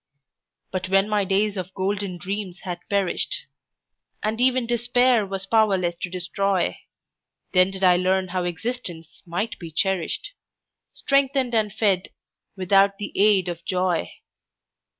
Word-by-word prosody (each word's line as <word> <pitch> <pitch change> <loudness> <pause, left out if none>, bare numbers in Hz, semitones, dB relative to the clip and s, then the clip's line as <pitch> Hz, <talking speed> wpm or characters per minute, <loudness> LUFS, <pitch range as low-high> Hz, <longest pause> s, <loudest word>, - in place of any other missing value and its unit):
But 185 0 -3
when 195 +1 +3
my 210 -1 +1
days 200 +2 +1
of 185 0 -5
golden 195 -1 -2
dreams 190 +1 -5
had 180 -3 -5
perished, 200 - 0 0.8
And 220 +2 -1
even 255 -1 +3
Despair 240 -1 +2
was 195 0 -3
powerless 195 -5 +2
to 180 - -3
destroy, 185 +1 -1 0.7
Then 185 0 +5
did 195 0 -7
I 180 -1 +6
learn 185 +1 +1
how 180 0 -1
existence 175 -3 -5
might 210 +7 -3
be 170 - -7
cherished, 180 +1 -1 0.6
Strengthened 275 -2 +1
and 215 -2 +2
fed 200 -3 +1 0.5
without 195 +1 +3
the 205 - -5
aid 195 -2 +4
of 170 -1 -5
joy. 180 - 0
195 Hz, 130 wpm, -24 LUFS, 185-215 Hz, 0.8 s, I